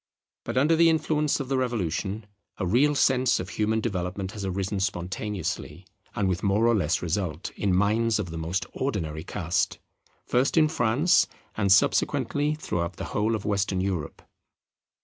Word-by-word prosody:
But - - -3
under 150 +5 +4
the 165 +1 +5
influence 155 -2 +1
of 135 - -4
the 135 0 0
Revolution 105 -3 -2 0.3
a 95 - -2
real 135 +10 +3
sense 130 -2 +3
of 90 - -5
human 110 +2 0
development 95 -2 -3
has 105 -2 -7
arisen 95 +1 -2
spontaneously 95 -2 -3 0.3
and 100 - +1
with 90 -1 -1
more 100 +3 +2
or 120 - +4
less 90 -6 0
result, 85 -1 -2
in 95 -3 0
minds 110 +4 +2
of 85 - -4
the 85 - -5
most 85 +4 -2
ordinary 80 - -3
cast; 85 -1 -1 0.5
first 130 +6 +1
in 155 -1 +5
France, 150 +3 +3 0.3
and 100 -3 +1
subsequently 145 +9 +2
throughout 85 - -3
the - - -6
whole 110 +2 +1
of 105 - -5
Western 100 -2 0
Europe. 90 -6 -3
100 Hz, 160 wpm, -26 LUFS, 90-125 Hz, 0.5 s, the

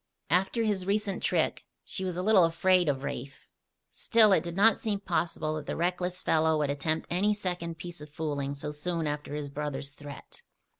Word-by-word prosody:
After 195 +6 +2
his 200 -4 0
recent 200 -1 0
trick - - 0 0.2
she 190 - -5
was 180 -2 -3
a 180 - -1
little 205 -3 +6
afraid 175 +1 +3
of 135 -1 -1
Rafe. 135 +1 -6 0.5
Still 220 -3 +4
it 190 - +5
did 170 -1 -5
not 215 +4 +5
seem 210 -3 -1
possible 165 -4 -1
that 150 - -7
the - - -2
reckless 180 +1 -1
fellow 160 0 +3
would 145 -2 +1
attempt 155 +3 -1
any 205 +4 +2
second 175 -4 -3
piece 175 -1 -8
of 150 - -9
fooling 145 -2 -3
so 150 +1 -4
soon 165 +2 -2
after 145 0 -3
his 145 -2 -4
brother's 145 -1 -4
threat. 145 0 -11
170 Hz, 190 wpm, -29 LUFS, 150-190 Hz, 0.5 s, little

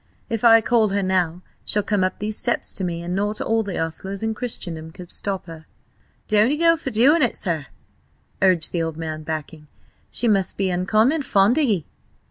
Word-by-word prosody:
If 225 0 -2
I 225 -1 +7
call 225 -2 +2
her 200 0 0
now 180 -2 0 0.2
she'll 210 - +1
come 205 -2 0
up 185 0 -1
these 215 +1 -3
steps 240 - -1
to 195 - -3
me, 170 -1 -3
and 175 +1 -3
not 205 +2 -1
all 225 0 +1
the 200 -4 -5
ostlers 190 +5 -3
in 220 0 0
Christendom 175 -9 -5
could 180 +1 -12
stop 195 -2 -3
her." 165 -2 -11 0.6
"Don't'ee 215 +7 +3
go 335 +1 +4
for 325 - -15
to 230 - -10
do 255 +7 +6
it, 265 -9 +2
sir!" 160 -6 -2 0.7
urged 185 -4 +3
the 170 - -1
old 165 -1 -3
man, 155 -1 -5
backing. 155 0 -6 0.4
"She 240 - -2
must 195 -4 +2
be 195 -2 0
uncommon 215 - +2
fond 210 +2 +3
o' - - +3
ye?" 210 - +1
195 Hz, 200 wpm, -22 LUFS, 170-225 Hz, 0.7 s, I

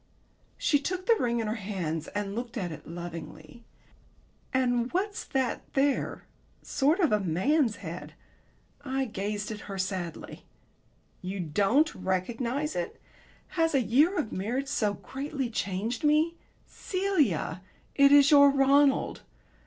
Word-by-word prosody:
She 290 - +2
took 370 +5 -3
the 465 - +5
ring 235 -1 0
in - - -3
her 215 - -1
hands 170 -6 -3
and 205 -1 -4
looked 235 +2 -5
at 180 -5 -3
it 155 -1 -10
lovingly. 165 +2 -8 0.9
"And 245 -2 +1
what's 400 +3 -1
that 265 -2 -1
there? 275 0 +1 0.4
Sort 300 +7 +1
of 335 -6 +3
a 210 - +3
man's 220 - +1
head." - - -7 0.7
I 265 -1 -1
gazed 210 -1 -3
at 210 - -6
her 195 - -4
sadly. 185 -3 -4 0.8
"You 190 +2 -5
don't 205 - +2
recognize 235 +10 -2
it? 175 -1 -4 0.5
Has 325 -3 +1
a 270 - +4
year 300 - +3
of 220 - -1
marriage 245 +8 -2
so 215 -8 0
greatly 270 -1 -4
changed 205 +4 -2
me? 305 +3 +3 0.3
Celia, 305 - -1 0.3
it 280 0 +5
is 285 0 +7
your 285 -1 +8
Ronald! 275 0 +3
240 Hz, 135 wpm, -28 LUFS, 195-285 Hz, 0.9 s, your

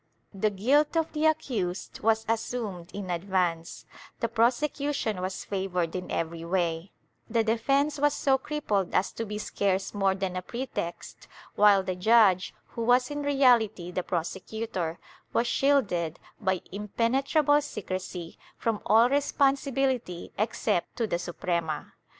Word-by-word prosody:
The 205 +2 +1
guilt 275 - +2
of 320 -1 0
the 310 0 +2
accused 220 - -2
was 220 0 +2
assumed 220 -6 -3
in 195 -3 -5
advance; 175 -2 -1 0.3
the 230 - 0
prosecution 240 -1 0
was 185 +1 -4
favored 185 -4 -2
in 180 0 -4
every 165 0 -3
way; 170 0 -1 0.4
the 230 0 +2
defence 275 +7 +1
was 290 0 +3
so 265 -1 +2
crippled 215 -11 -1
as 190 - +2
to 230 - -5
be 210 +1 -4
scarce 195 -2 -1
more 195 -2 +2
than 190 -1 -3
a 185 - -2
pretext, 235 -5 -6 0.3
while 205 -2 +5
the 185 - -2
judge, 195 -2 +4 0.2
who 235 - -6
was 250 +3 +3
in 290 0 -3
reality 240 -10 +3
the 185 - -1
prosecutor, 180 0 -3 0.4
was 235 - +2
shielded, 210 - +1 0.2
by 190 -4 0
impenetrable 265 - +2
secrecy, 185 - -6 0.2
from 225 -2 -1
all 225 +4 +6
responsibility 270 -7 0
except 215 -4 -1
to 230 - 0
the 170 -5 -1
Suprema. 170 -3 -3
210 Hz, 135 wpm, -28 LUFS, 185-255 Hz, 0.4 s, all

